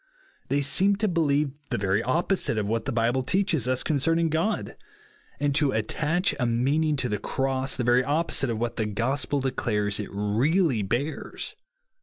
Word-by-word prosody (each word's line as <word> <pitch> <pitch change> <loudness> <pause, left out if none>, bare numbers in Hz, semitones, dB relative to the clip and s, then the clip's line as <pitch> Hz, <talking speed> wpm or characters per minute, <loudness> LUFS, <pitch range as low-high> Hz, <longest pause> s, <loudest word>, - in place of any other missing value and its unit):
They 145 0 +1
seem 190 +9 +3
to 215 +2 0
believe 150 -5 +1 0.2
the - - -1
very 100 +1 +1
opposite 165 - 0
of 105 - 0
what 115 +4 -1
the 135 - -1
Bible 120 +2 +1
teaches 165 - +1
us 130 0 +1
concerning 165 +3 +1
God; 165 +7 -1 0.6
and 145 0 +1
to 145 -1 +2
attach 155 - 0
a 125 - +1
meaning 140 +7 +1
to 130 -3 -1
the 105 -3 -2
Cross, 135 0 -1
the 125 - -2
very 120 +1 +4
opposite 145 -2 0
of 115 - -1
what 120 +1 -3
the 110 - 0
gospel 130 +6 -1
declares 105 -6 -1
it 105 - -4
really 115 - +1
bears. 120 +10 -3
135 Hz, 170 wpm, -26 LUFS, 115-155 Hz, 0.6 s, very